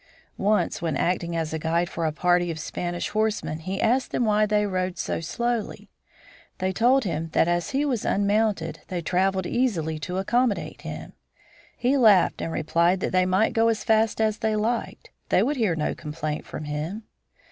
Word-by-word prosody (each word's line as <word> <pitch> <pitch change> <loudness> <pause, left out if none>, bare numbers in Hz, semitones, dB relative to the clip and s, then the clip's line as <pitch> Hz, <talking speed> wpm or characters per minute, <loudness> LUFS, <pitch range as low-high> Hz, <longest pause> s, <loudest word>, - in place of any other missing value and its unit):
Once 200 -4 +1
when 160 -5 -1
acting 170 +1 -1
as 160 -1 -2
a 160 - -2
guide 165 +2 0
for 165 -1 -2
a - - 0
party 175 +2 +2
of 165 - -3
Spanish 175 +2 -3
horsemen 215 -7 -1
he 185 +4 -4
asked 255 +3 +2
them 245 - 0
why 215 0 +3
they 210 0 +2
rode 185 -2 -2
so - - -2
slowly. 235 +7 -3 0.7
They 185 0 -1
told 250 +6 +3
him 165 -4 -3
that - - +3
as 175 0 0
he 280 +2 0
was 250 -7 -1
unmounted 200 -6 0
they 175 -2 -4
traveled 190 +2 +1
easily 170 -11 0
to 180 +4 -4
accommodate 235 +3 0
him. - - -7 0.6
He 260 +3 +2
laughed 215 -8 +5
and 165 - -3
replied 170 +4 +1
that - - -1
they 185 0 +3
might 190 +4 +2
go 225 0 +3
as 225 -1 -1
fast 220 -1 +2
as 215 -1 +1
they 220 -1 0
liked, 235 - -2 0.2
they - - +4
would 290 +2 0
hear 210 -8 +1
no 155 - -1
complaint 155 -1 -5
from - - -6
him. 155 +9 -4
185 Hz, 185 wpm, -25 LUFS, 165-220 Hz, 0.7 s, laughed